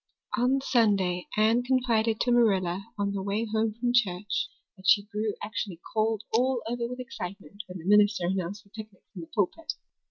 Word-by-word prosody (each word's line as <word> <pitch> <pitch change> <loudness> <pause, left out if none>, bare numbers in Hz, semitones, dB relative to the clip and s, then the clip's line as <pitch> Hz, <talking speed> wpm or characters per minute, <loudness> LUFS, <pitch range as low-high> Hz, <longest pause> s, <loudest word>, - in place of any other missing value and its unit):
On 255 +2 +2
Sunday 200 -8 +2
Anne 220 +3 +4
confided 235 -3 +1
to 245 - +2
Marilla 195 -6 +2
on 200 -1 0
the 195 - -2
way 200 +3 -1
home 220 0 0
from 240 0 +1
church 205 -4 +1 0.3
that 190 -1 -9
she 205 - +6
grew 210 0 -2
actually 205 -5 -4
cold 220 -1 +1
all 250 +1 +2
over 235 0 -2
with 250 +1 -7
excitement 200 - -7
when 185 0 -7
the 165 - -10
minister 205 -2 +4
announced 190 +2 -2
the 200 - -26
picnic 215 -2 -10
from 180 - -7
the 165 - -9
pulpit. 230 - -1
215 Hz, 180 wpm, -28 LUFS, 195-235 Hz, 0.3 s, she